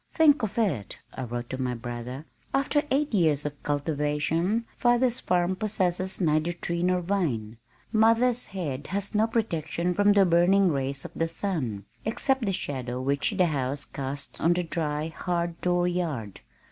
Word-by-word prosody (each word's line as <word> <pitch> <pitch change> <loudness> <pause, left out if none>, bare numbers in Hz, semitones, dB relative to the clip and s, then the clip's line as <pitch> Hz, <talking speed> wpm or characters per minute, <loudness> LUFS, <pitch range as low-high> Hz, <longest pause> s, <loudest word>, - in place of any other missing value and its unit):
"Think 300 -4 +5
of 215 -1 -3
it!" 155 - 0 0.2
I 130 - -4
wrote 120 0 -5
to 130 0 -3
my 125 -1 -1
brother. 120 +4 -6 0.3
"After 280 +2 +2
eight 285 0 +1
years 155 -7 +2
of 145 -1 -5
cultivation, 150 +8 0
father's 245 0 +3
farm 180 +1 +1
possesses 190 -3 -1
neither 160 -1 +2
tree 170 0 -3
nor 180 0 +2
vine. 140 - -1 0.3
Mother's 230 +2 +3
head 150 -8 -4
has 200 +4 -2
no 215 +1 +3
protection 175 -6 -1
from 205 +2 +4
the 200 -1 +5
burning 180 +3 +4
rays 135 -1 -2
of - - -7
the 165 - 0
sun, 155 - -3 0.2
except 265 +4 0
the - - +2
shadow 130 -8 -3
which 140 - 0
the 185 - +5
house 140 -2 -1
casts 140 +1 -5
on 170 +2 +4
the 180 0 0
dry, 155 -2 -2
hard 170 0 -2
door 175 0 +2
yard. 155 - -3
170 Hz, 160 wpm, -27 LUFS, 140-200 Hz, 0.3 s, Think